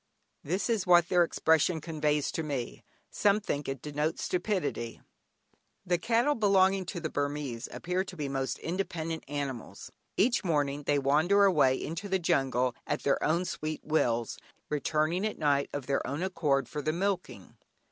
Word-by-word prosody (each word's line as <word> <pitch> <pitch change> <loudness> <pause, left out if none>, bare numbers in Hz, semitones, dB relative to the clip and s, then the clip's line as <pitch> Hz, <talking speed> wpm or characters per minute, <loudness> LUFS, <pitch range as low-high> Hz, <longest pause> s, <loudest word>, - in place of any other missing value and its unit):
This 180 +7 -1
is 220 -6 0
what 175 -1 +6
their 180 -1 +5
expression 160 0 +2
conveys 150 -2 0
to - - -2
me; 140 -6 -4 0.3
some 205 0 +3
think 145 -9 -3
it 135 -2 -5
denotes 150 +2 -2
stupidity. 180 - -2 0.9
The 175 -1 +1
cattle 235 +8 +2
belonging 195 -4 +3
to 180 - -4
the 155 -2 -4
Burmese 145 -4 -3
appear 180 +2 -2
to 185 -1 -9
be 145 -2 -2
most 135 -1 -2
independent 165 -2 -3
animals. 140 -4 -5 0.3
Each 235 +2 +3
morning 145 -4 0
they 145 - +3
wander 155 +9 +3
away 150 -9 +4
into 170 +9 -5
the 190 - +2
jungle 135 -8 +1
at 150 -1 -2
their 140 - +1
own 170 +4 +1
sweet 155 -3 -4
wills, 120 -7 0 0.3
returning 155 +4 0
at 215 - -2
night 140 -2 +1
of 145 -3 -4
their 140 0 0
own 145 +6 -3
accord 145 -8 0
for 150 +4 -4
the 155 +2 -1
milking. 180 - -3
155 Hz, 160 wpm, -30 LUFS, 140-185 Hz, 0.9 s, what